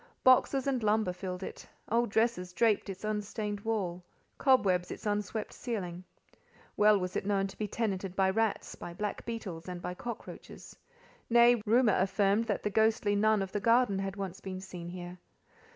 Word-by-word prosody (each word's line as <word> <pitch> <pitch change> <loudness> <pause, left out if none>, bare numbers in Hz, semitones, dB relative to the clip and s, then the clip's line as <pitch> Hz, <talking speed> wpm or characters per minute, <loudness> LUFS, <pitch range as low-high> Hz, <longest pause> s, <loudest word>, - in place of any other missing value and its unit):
Boxes 255 +1 +4
and 265 -3 0
lumber 215 -3 +2
filled 180 0 -5
it; - - -8 0.2
old 235 0 +2
dresses 220 -5 0
draped 215 +1 +2
its 195 +1 -7
unstained 210 0 -3
wall—cobwebs 190 0 0
its - - -8
unswept 210 +1 -2
ceiling. 185 -7 -4 0.7
Well 210 0 +5
was 180 0 -4
it - - -1
known 195 -1 +1
to 195 - -7
be 215 - -1
tenanted 195 -4 -2
by 190 -1 +3
rats, 225 +1 -1
by 170 - -8
black 210 +1 -3
beetles, 190 -7 -5
and 180 -1 -5
by 180 +1 -4
cockroaches—nay, 235 +2 -1
rumour 230 -1 +4
affirmed 195 +3 +2
that - - -2
the 210 - -1
ghostly 220 0 +2
Nun 215 0 +3
of 190 - -7
the 205 - -1
garden 230 -1 +3
had 195 0 -3
once 195 -2 -5
been 190 -1 -6
seen 180 -2 -8
here. 180 0 -8
205 Hz, 165 wpm, -31 LUFS, 185-225 Hz, 0.7 s, Well